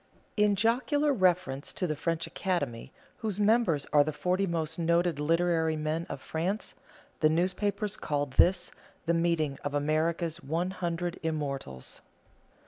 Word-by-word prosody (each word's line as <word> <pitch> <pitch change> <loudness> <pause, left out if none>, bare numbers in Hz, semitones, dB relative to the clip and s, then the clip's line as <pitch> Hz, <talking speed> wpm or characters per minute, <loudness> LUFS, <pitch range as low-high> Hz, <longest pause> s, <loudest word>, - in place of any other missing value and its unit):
In 210 -1 +3
jocular 260 +7 +2
reference 180 - +1
to 185 - -2
the 155 -3 -1
French 165 +2 -1
Academy, 140 -10 -2 0.3
whose 215 -5 -3
members 205 - +3
are 145 -1 +7
the 155 - -2
forty 185 +5 0
most 165 -1 -2
noted 170 -1 +2
literary 165 +1 +2
men 155 +2 -2
of - - -6
France, 180 +7 -2 0.5
the 155 - +4
newspapers 200 +5 0
called 145 -2 -2
this 180 +3 +4 0.3
the 170 - +2
meeting 165 -4 +1
of 145 0 -2
America's 160 +3 0
one 170 +6 -1
hundred 175 -1 -3
immortals. 140 - -4
170 Hz, 135 wpm, -29 LUFS, 155-185 Hz, 0.5 s, are